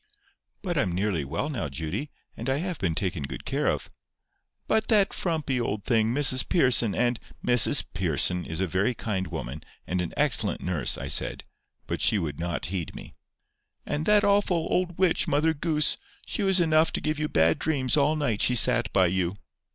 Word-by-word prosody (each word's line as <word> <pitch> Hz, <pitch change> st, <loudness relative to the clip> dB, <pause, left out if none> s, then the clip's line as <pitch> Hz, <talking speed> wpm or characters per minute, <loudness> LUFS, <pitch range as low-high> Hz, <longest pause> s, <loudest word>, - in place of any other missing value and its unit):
"But 175 Hz, -5 st, -1 dB
I'm 90 Hz, -8 st, 0 dB
nearly 95 Hz, -5 st, -1 dB
well 80 Hz, -, -3 dB
now, 120 Hz, -, -4 dB
Judy, 80 Hz, -, -5 dB, 0.3 s
and 115 Hz, +4 st, -5 dB
I 135 Hz, -, +1 dB
have 175 Hz, 0 st, -4 dB
been 85 Hz, -4 st, -1 dB
taken 90 Hz, -5 st, -2 dB
good 70 Hz, -, -7 dB
care -, -, -1 dB
of." -, -, -1 dB, 0.8 s
"By -, -, +3 dB
that 215 Hz, -3 st, +2 dB
frumpy 155 Hz, -7 st, -2 dB
old 105 Hz, -3 st, -3 dB
thing, 115 Hz, -2 st, +1 dB
Mrs 130 Hz, -1 st, +4 dB
Pearson, 120 Hz, -, +3 dB
and—" 120 Hz, +3 st, 0 dB, 0.3 s
"Mrs 125 Hz, +3 st, +5 dB
Pearson 90 Hz, 0 st, +1 dB
is 80 Hz, +1 st, -6 dB
a -, -, +1 dB
very 95 Hz, +7 st, -1 dB
kind 95 Hz, -5 st, -3 dB
woman, 70 Hz, +6 st, -6 dB, 0.2 s
and 90 Hz, +1 st, -2 dB
an 85 Hz, -, -4 dB
excellent -, -, +1 dB
nurse," 85 Hz, -7 st, -1 dB
I -, -, -6 dB
said; -, -, 0 dB, 0.4 s
but -, -, -4 dB
she 110 Hz, -, +3 dB
would 80 Hz, -5 st, -4 dB
not 85 Hz, 0 st, -3 dB
heed 90 Hz, -5 st, -4 dB
me. -, -, -10 dB, 0.7 s
"And 150 Hz, +2 st, -3 dB
that 210 Hz, 0 st, +4 dB
awful 200 Hz, -5 st, +2 dB
old 175 Hz, -2 st, -1 dB
witch, 185 Hz, -3 st, +1 dB
Mother 155 Hz, +3 st, +1 dB
Goose. 155 Hz, 0 st, 0 dB, 0.3 s
She -, -, -4 dB
was 190 Hz, -2 st, +2 dB
enough 160 Hz, -1 st, +3 dB
to -, -, -1 dB
give 155 Hz, -1 st, -2 dB
you 155 Hz, -, -1 dB
bad 80 Hz, -, +2 dB
dreams 140 Hz, -4 st, 0 dB
all 150 Hz, +1 st, +2 dB
night 135 Hz, -9 st, -1 dB
she 125 Hz, -, +4 dB
sat 115 Hz, 0 st, +4 dB
by 95 Hz, -2 st, +4 dB
you." 90 Hz, +1 st, -1 dB
120 Hz, 190 wpm, -26 LUFS, -, 0.8 s, Mrs